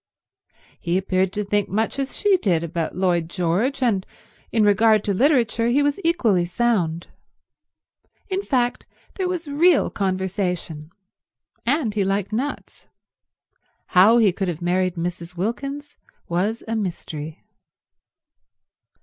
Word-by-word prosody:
He 175 +1 0
appeared 190 -1 0
to 210 - -2
think 205 0 0
much 220 +6 -1
as 270 0 -3
she 410 -2 +3
did 175 - +1
about 165 -1 -3
Lloyd 175 -3 0
George, 195 +11 0
and 205 -6 +1 0.5
in 225 - +2
regard 215 +1 +4
to 200 - 0
literature 235 -1 +2
he 270 +5 +3
was 285 +3 0
equally 235 - +2
sound. 175 -4 0 1.2
In 385 0 -1
fact 250 -8 -1 0.3
there 375 -2 0
was 355 -3 -3
real 310 +3 +3
conversation, 185 -5 -2 0.8
and 265 -5 +1
he 205 -1 +1
liked 195 +1 -1
nuts. 270 +6 -4 1.0
How 205 +5 +6
he 220 -5 +5
could 195 +1 -2
have 170 -3 -3
married 180 +1 0
Mrs. 170 0 -5
Wilkins 275 +9 -4 0.3
was 200 +7 -1
a 225 - -2
mystery. 160 -6 -5
205 Hz, 125 wpm, -22 LUFS, 180-245 Hz, 1.2 s, How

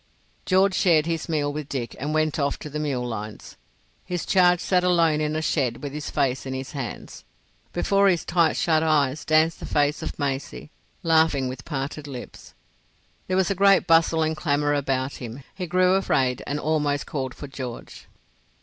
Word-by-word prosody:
George 190 +1 +4
shared 165 -5 +3
his 165 0 -3
meal 145 -2 0
with 150 -1 -6
Dick 125 -4 -4
and 145 +3 -3
went 155 0 0
off 140 -1 0
to 150 - -9
the 150 - -3
mule 135 -5 -2
lines. 110 -2 -7 0.5
His 180 -2 -4
charge 180 -2 +4
sat 180 0 +1
alone 165 -4 +3
in 150 0 -1
a 155 - -1
shed 130 -5 -1
with 140 -1 -5
his 150 0 -5
face 135 -1 -1
in 130 - -3
his 130 0 -6
hands. 130 -7 -7 0.5
Before 200 0 +2
his 175 -3 +2
tight 170 -2 +2
shut 160 -2 +2
eyes 150 -3 +1
danced 160 +1 +2
the - - -7
face 145 +1 +1
of - - -5
Maisie, 140 +1 -4 0.3
laughing, 160 -5 +3
with 130 0 -7
parted 145 0 -4
lips. 130 -3 -10 0.7
There 185 - 0
was 190 0 +2
a - - +3
great 195 -1 +4
bustle 165 -1 +4
and 160 0 0
clamour 145 -2 0
about 135 -1 -1
him. 120 +3 -7
He 180 -2 -5
grew 180 +1 +3
afraid 130 -10 +1
and 145 +1 -2
almost 150 -2 0
called 130 -3 -4
for - - -8
George. 130 -3 -8
150 Hz, 185 wpm, -24 LUFS, 135-165 Hz, 0.7 s, George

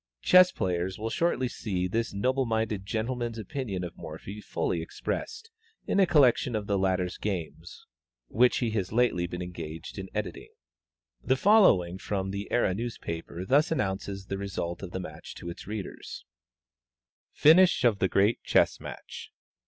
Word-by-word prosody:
Chess 185 0 +7
players 90 0 -2
will 110 +1 -4
shortly 165 -7 +1
see 95 -6 -2
this 115 +5 -1
noble 130 +6 0
minded 110 -3 -1
gentleman's 115 +2 -2
opinion 105 -3 -4
of 85 -1 -6
Morphy 95 +7 -8
fully 85 -3 -2
expressed, 450 - -5 0.3
in - - +1
a 190 - +5
collection 130 -6 +4
of 105 -1 -2
the 100 -1 0
latter's 95 -1 0
games 85 -4 -5 0.4
which 125 - +3
he 115 - -1
has 100 -4 -2
lately 110 -7 +2
been 90 0 -5
engaged 85 -1 -7
in 95 0 -6
editing. 105 -1 -5 0.7
The 130 - +2
following 130 - +5
extract - - -13
from 95 0 -2
The 100 +1 -5
Era 120 -6 +2
newspaper 90 -6 -5
thus 145 - +3
announces 95 -7 -2
the 100 0 -4
result 90 -3 -4
of 95 - -6
the 95 - -5
match 80 -4 -9
to 85 - -6
its 85 - -11
readers: 105 -2 -7 1.1
FINISH 170 -1 +6
OF 115 -5 +3
THE 95 - +3
GREAT 100 +5 +2
CHESS - - +3
MATCH. - - -9
100 Hz, 160 wpm, -28 LUFS, 90-120 Hz, 1.1 s, Chess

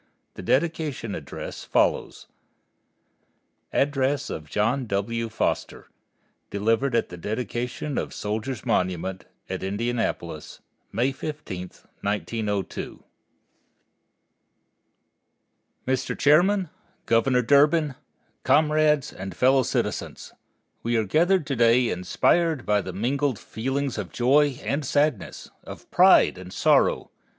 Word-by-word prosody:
The - - -9
dedication 150 -7 -1
address - - -7
follows. - - 0 1.5
ADDRESS 140 0 0
OF 75 -1 -7
JOHN 115 +5 0
W. 115 +3 -2
FOSTER, 110 - -2 0.6
DELIVERED 115 +5 +1
AT 115 - +1
THE 90 - -9
DEDICATION 120 - -3
OF - - -4
SOLDIERS' 110 +2 -4
MONUMENT, 90 +1 -1 0.2
AT - - -4
INDIANAPOLIS 115 +5 -3 0.3
MAY 120 +6 +1
15, 135 -10 -6 0.4
1902 105 -1 -3 2.8
Mr. 130 0 -1
Chairman, 180 +4 +3 0.3
Governor 125 +2 +3
Durbin, 145 +3 +4 0.5
Comrades 150 0 +3
and 95 -1 -7
Fellow 130 +4 +4
Citizens: - - -3 0.5
We 120 0 0
are 110 - +2
gathered 170 - +2
to 135 - -2
day 120 +1 +4
inspired 155 - +1
by 105 -1 +2
mingled 120 +8 -1
feelings 135 +1 -3
of 95 -5 -5
joy 135 +2 +3
and 145 +2 -1
sadness, 145 -4 -1
of - - -11
pride - - +5
and 90 0 -10
sorrow. - - +2
125 Hz, 100 wpm, -25 LUFS, 105-145 Hz, 2.8 s, pride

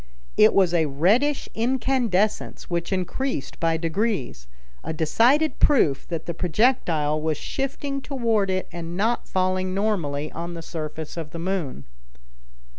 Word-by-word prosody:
It 215 - +6
was 185 -3 +4
a 160 -3 +3
reddish 210 - +2
incandescence 235 -6 0
which 170 +2 -1
increased 190 - -2
by 165 -1 +2
degrees, 165 - -2 0.4
a - - -3
decided 240 - +3
proof 155 - +3
that 165 -2 -4
the 170 - -3
projectile 165 - +1
was 155 -1 0
shifting 275 - -3
toward 230 -8 0
it 185 0 -1
and 170 0 -6
not 225 +4 0
falling 185 0 0
normally 160 -8 -1
on 170 +1 -5
the 165 - -7
surface 155 -1 -6
of 160 -2 -4
the 170 - -8
moon. 170 - -3
185 Hz, 135 wpm, -24 LUFS, 160-225 Hz, 0.4 s, It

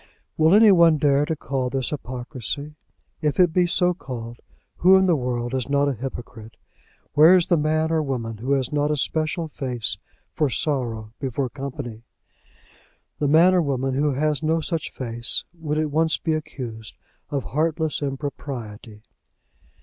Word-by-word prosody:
Will 160 +4 +5
any 215 0 +7
one 170 -4 +6
dare 145 0 +3
to 160 - -1
call 135 -3 -2
this 130 0 -2
hypocrisy? 130 +1 -5 0.5
If 150 +1 0
it 175 -3 +5
be 180 0 +3
so 180 0 +2
called, 120 -7 -8 0.4
who 185 +2 +6
in 190 - +3
the 175 -3 +3
world 125 -2 -2
is 130 0 -2
not 140 0 +2
a 140 - +1
hypocrite? 120 -2 -8 0.6
Where 155 +5 +7
is 180 -2 +4
the 175 - +3
man 155 +1 +1
or 160 -1 +2
woman 120 -6 -3
who 130 +6 -1
has 135 0 0
not 145 0 +1
a 150 - +1
special 155 +4 -1
face 125 -6 -3 0.3
for 150 - +1
sorrow 120 -7 -2
before 135 -1 -2
company? 135 -4 -6 1.2
The 145 - +1
man 165 +5 +6
or 180 - +4
woman 135 -3 -1
who 145 +2 +1
has 150 +2 0
no 160 +1 +1
such 165 0 -3
face, 120 -1 -2
would 155 -3 -3
at 155 -1 0
once 160 +1 +2
be 160 - -1
accused 120 -8 -6 0.3
of 140 -3 -2
heartless 160 +1 -1
impropriety. 130 -6 -6
145 Hz, 165 wpm, -23 LUFS, 125-160 Hz, 1.2 s, any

